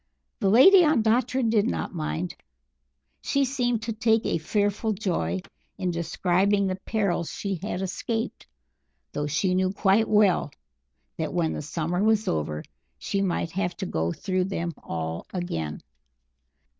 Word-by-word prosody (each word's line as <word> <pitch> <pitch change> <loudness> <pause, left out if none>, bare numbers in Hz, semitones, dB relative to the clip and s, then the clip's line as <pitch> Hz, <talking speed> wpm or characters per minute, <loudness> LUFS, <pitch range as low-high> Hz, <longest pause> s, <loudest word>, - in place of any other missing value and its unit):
The 200 -5 +2
Lady 360 - +8
Ondatra 250 -3 +2
did 220 -1 +3
not - - -2
mind. 165 +1 -3 0.9
She 280 0 +1
seemed 245 -4 0
to 230 0 -2
take 225 0 +2
a - - 0
fearful 205 +5 0
joy 165 - -1 0.4
in 180 -1 -1
describing 185 +4 +1
the 185 -1 -1
perils 195 -7 0
she 195 -3 -3
had 195 -2 -3
escaped, 225 +5 -3 0.6
though 145 0 -2
she 180 +5 +1
knew 185 0 +2
quite 200 +2 +2
well 210 -7 +4 0.7
that 160 +2 -3
when 165 -2 +1
the - - -4
summer 165 +5 -2
was 220 0 +2
over 75 -1 -1 0.3
she 195 - -2
might 175 -3 -1
have 180 -1 -2
to - - -3
go 80 - -1
through 185 - -1
them 170 -3 -3
all 80 0 -5
again. 80 - -3
190 Hz, 145 wpm, -26 LUFS, 170-220 Hz, 0.9 s, Lady